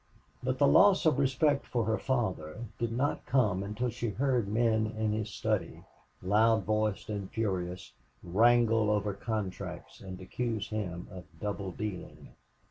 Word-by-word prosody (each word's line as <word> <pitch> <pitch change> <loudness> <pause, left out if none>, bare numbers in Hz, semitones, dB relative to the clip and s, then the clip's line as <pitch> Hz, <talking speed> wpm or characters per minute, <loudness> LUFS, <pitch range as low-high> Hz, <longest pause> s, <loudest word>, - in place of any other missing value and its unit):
But 130 0 -1
the 140 - +4
loss 200 +2 +6
of 150 -4 +3
respect 140 +1 +2
for 120 -3 0
her 110 0 0
father 110 - -2
did 115 -1 -1
not 130 +5 -1
come 110 -8 +2
until 105 +5 -2
she 120 0 -3
heard 125 -1 0
men 110 0 +2
in 110 -1 0
his 110 0 -2
study, - - -2 0.4
loud 110 +3 +3
voiced 110 +1 0
and 100 -3 -4
furious, 90 -5 -3 0.3
wrangle 115 +3 +4
over 105 -1 +1
contracts 100 -4 -5
and 95 -1 -8
accuse 110 +2 -3
him 90 -5 -4
of 90 -4 -9
double 100 -2 -3
dealing. 100 -1 -6
110 Hz, 145 wpm, -30 LUFS, 100-120 Hz, 0.4 s, loss